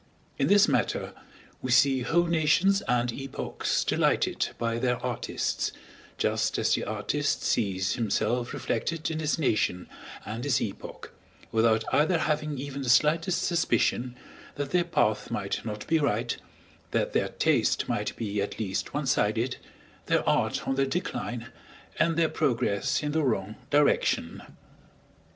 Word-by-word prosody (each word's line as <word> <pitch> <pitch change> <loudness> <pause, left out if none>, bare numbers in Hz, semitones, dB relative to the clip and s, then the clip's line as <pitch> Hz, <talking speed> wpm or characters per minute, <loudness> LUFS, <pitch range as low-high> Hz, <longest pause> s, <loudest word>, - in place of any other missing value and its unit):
In - - +2
this 205 +1 +6
matter - - 0 0.5
we 130 - -4
see 135 +1 +4
whole 170 +8 +2
nations 170 +4 +3
and 120 0 +1
epochs 135 +1 -2
delighted - - +1
by 115 0 -1
their 125 0 +1
artists, - - -2 0.5
just - - 0
as - - +2
the - - 0
artist - - -1
sees 95 -4 0
himself 120 +2 0
reflected 155 +8 -2
in 160 - -3
his 155 -1 0
nation 105 - 0 0.4
and 110 +3 -5
his 140 -4 +2
epoch, 100 - -6 0.4
without 110 0 +3
either 160 +4 +3
having 150 -1 -1
even 140 +1 -5
the 130 - -3
slightest 165 +7 +3
suspicion 125 -6 +1 0.4
that 140 -1 -4
their 180 -1 +2
path 110 -11 +1
might 100 -1 -3
not 105 -2 -5
be 160 0 +2
right, 120 -5 0 0.5
that - - -1
their - - +1
taste - - +1
might - - -2
be 105 -3 -2
at 100 - -4
least 100 +2 -3
one 145 -1 -1
sided, 115 +1 +1 0.5
their - - +1
art - - +1
on - - +1
the 135 0 +1
decline, 125 -6 -3 0.5
and 165 -1 +2
their 165 -1 +4
progress 115 -4 0
in 150 - -1
the 160 +1 +1
wrong 110 -6 -1
direction. 145 0 +2
130 Hz, 145 wpm, -27 LUFS, 115-155 Hz, 0.5 s, this